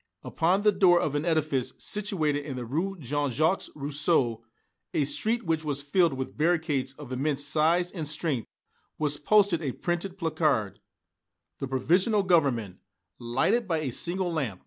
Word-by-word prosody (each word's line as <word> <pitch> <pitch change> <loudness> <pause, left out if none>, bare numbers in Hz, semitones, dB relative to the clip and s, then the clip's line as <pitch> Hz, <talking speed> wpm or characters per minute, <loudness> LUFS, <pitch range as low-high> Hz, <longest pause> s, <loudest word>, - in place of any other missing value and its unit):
Upon 180 +5 +1
the 210 - +5
door 185 -3 +5
of 150 - -1
an 145 +2 -1
edifice 155 -6 0
situated 160 -9 -1
in 140 -2 -6
the 125 -1 -5
Rue 170 +11 -2
Jean 145 -1 -2
Jacques 155 +9 0
Rousseau 140 -5 0 0.5
a 150 - +3
street 225 - 0
which 160 -1 0
was 145 -2 -2
filled 165 +2 +2
with 130 0 -5
barricades 155 -5 0
of 130 - -11
immense 140 +2 -1
size 165 +4 +2
and 160 -6 -5
strength 150 -5 -2 0.5
was 150 -1 +1
posted 200 0 +3
a 135 -5 -2
printed 175 +2 -3
placard, 155 - 0 0.8
"The 135 - -3
Provisional 185 - +2
Government," 130 - +1 0.4
lighted 160 - 0
by 165 -3 0
a 135 -4 -2
single 175 +6 -2
lamp. 125 - -2
155 Hz, 155 wpm, -27 LUFS, 140-175 Hz, 0.8 s, the